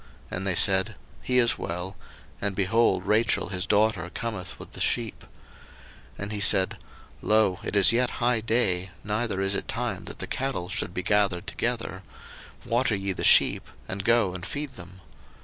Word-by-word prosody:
And 95 +2 -3
they 90 - 0
said, 95 +4 +3 0.3
He 125 - 0
is 120 -2 +4
well: 90 +2 -5 0.5
and, 100 -1 -1
behold, 95 -1 +2
Rachel 110 +2 +2
his 90 -2 -2
daughter 105 -4 +2
cometh 100 -5 -5
with - - -11
the - - -9
sheep. 115 -2 -1
01:029:007 - - -19 0.9
And 100 +1 -5
he 105 - -4
said, 95 -1 +3 0.4
Lo, 105 -4 +2
it - - -4
is 100 0 +7
yet 125 +1 +2
high 120 -1 +2
day, 95 -5 0
neither 105 -1 -2
is 95 0 0
it - - -2
time 115 -6 -3
that - - -8
the - - -5
cattle 130 -10 -3
should 100 -4 -3
be 90 - -2
gathered 100 -3 +1
together: 115 -6 -3 0.6
water 120 -1 +1
ye 100 0 -2
the - - -5
sheep, - - +5 0.2
and 95 +1 -4
go 115 -5 +3
and 90 -1 -7
feed 145 +7 -4
them. 95 -1 -12
100 Hz, 175 wpm, -26 LUFS, 95-115 Hz, 0.9 s, is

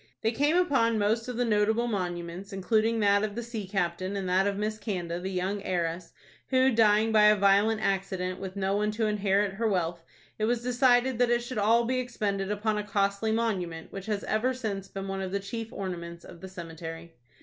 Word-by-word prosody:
They 225 - +2
came 290 +8 +2
upon 265 -10 +2
most 220 +3 +1
of 250 -2 -4
the 245 - +1
notable 220 +1 +2
monuments, 180 -2 -4
including 220 +4 +1
that 200 0 +4
of 210 -1 -2
the 235 - -3
sea 225 -4 -6
captain, 185 0 -2
and 195 -2 -3
that 185 +2 +3
of 200 -1 -1
Miss 215 +1 -2
Canda, 175 -5 -3
the 190 +2 -4
young 190 +2 -2
heiress, 175 -2 -2 0.4
who, 260 0 +3
dying 220 -1 +4
by 215 -1 +6
a 210 0 +7
violent 205 +2 +3
accident, 190 -2 -1
with 190 0 -6
no 195 0 0
one 210 +1 +1
to 220 +1 0
inherit 205 -1 +1
her 225 +3 -1
wealth, 175 -4 -1 0.4
it 215 - +1
was 235 +1 0
decided 250 0 +3
that 245 -1 +3
it 240 0 +2
should 240 -2 -4
all 230 +3 +4
be 255 +2 0
expended 205 -6 -2
upon 210 +1 0
a - - -2
costly 200 +1 0
monument, 190 -8 -2
which 195 0 -7
has 210 -2 -2
ever 250 +4 0
since 200 -6 -4
been 195 0 -6
one 195 0 -3
of 190 -1 -4
the 200 - 0
chief 225 +3 -6
ornaments 170 -3 -6
of 170 - -13
the 190 - -8
cemetery. 165 -1 -8
205 Hz, 210 wpm, -28 LUFS, 190-225 Hz, 0.4 s, a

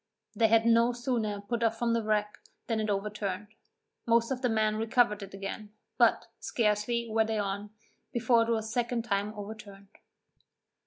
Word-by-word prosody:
They 225 - +4
had 225 +1 +4
no 235 +1 +4
sooner 235 -4 -2
put 235 +3 -3
off 225 -1 +1
from 235 0 +1
the 230 - +1
wreck, 210 -1 -1 0.3
than 225 -2 -1
it 215 0 -1
overturned; 205 -1 -3 0.6
most 230 +1 +3
of 255 -1 -2
the 250 - +1
men 215 -1 +1
recovered 225 -1 +2
it 195 0 -8
again, 205 +2 -6 0.3
but, - - +4
scarcely 230 +1 0
were 220 0 +2
they 220 0 -1
on, 205 0 -3 0.4
before 235 0 +3
it 230 - 0
was 220 -2 0
a 220 - -6
second 240 -1 -1
time 205 -2 -1
overturned. 205 -1 -9
220 Hz, 170 wpm, -29 LUFS, 210-235 Hz, 0.6 s, They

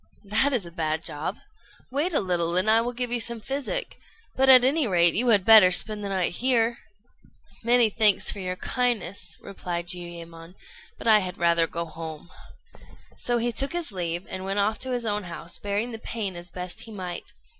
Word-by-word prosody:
"That 215 +8 +2
is 240 -9 +1
a 170 - -10
bad 160 -2 -2
job. 155 +4 -4 0.5
Wait 295 +7 0
a 305 - +1
little, 175 -2 -1
and 200 +4 +3
I 225 +1 +5
will 240 +1 -3
give 245 0 -3
you 240 - +2
some 235 0 -1
physic; 280 - -3 0.4
but, 265 0 +3
at 255 -1 +9
any 280 +1 +2
rate, 175 -3 +5
you 245 +4 +1
had 205 -5 +4
better 220 -4 +8
spend 210 +3 +1
the 200 - -4
night 190 -3 0
here." 235 +1 +1 0.8
"Many 240 0 +5
thanks 210 -2 +3
for 205 - -8
your 185 -1 -4
kindness," 200 -6 -2
replied 175 -3 -5
Jiuyémon; 170 -1 -7 0.4
"but - - -11
I 220 -2 +6
had 180 -2 -5
rather 170 -1 +2
go 170 +1 -4
home." 160 0 -9 0.8
So 240 0 -1
he 240 +1 0
took 270 +7 +1
his 345 -7 -4
leave, 175 -1 -4
and 185 0 -6
went 195 +1 -3
off 210 +2 0
to 260 - -4
his 245 -2 -2
own 210 -2 -2
house, 170 0 -5
bearing 205 +4 -2
the 225 - -7
pain 215 -5 -4
as 175 +1 -9
best 180 +1 -8
he 225 - -10
might. 185 -4 -7
200 Hz, 200 wpm, -25 LUFS, 175-235 Hz, 0.8 s, at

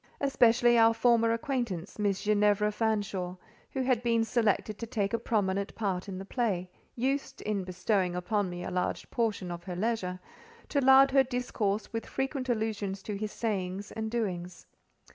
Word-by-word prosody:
Especially 240 -3 +4
our 225 0 +6
former 230 -1 +4
acquaintance, 230 - -3
Miss 200 -2 0
Ginevra 210 0 +3
Fanshawe,—who 205 +2 -3
had 250 -3 +2
been 230 -1 +2
selected 220 -2 0
to 230 - -5
take 205 -1 -1
a 230 - +1
prominent 200 -3 -1
part 195 -3 -2
in 185 - -5
the 190 - -6
play—used, 235 +6 -2
in 205 -2 -1
bestowing 185 0 0
upon 185 +2 0
me 175 0 -6
a - - -4
large 180 0 -2
portion 215 -6 -1
of 170 0 -7
her 180 - -5
leisure, 185 -3 -1 0.5
to 285 - +1
lard 265 +1 +7
her 270 0 +6
discourse 245 -6 -2
with 225 - -3
frequent 265 -1 -3
allusions 210 -4 -2
to 210 - -4
his 210 +1 -4
sayings 200 -3 -3
and 220 0 -3
doings. 185 -6 -3
215 Hz, 160 wpm, -30 LUFS, 190-235 Hz, 0.5 s, lard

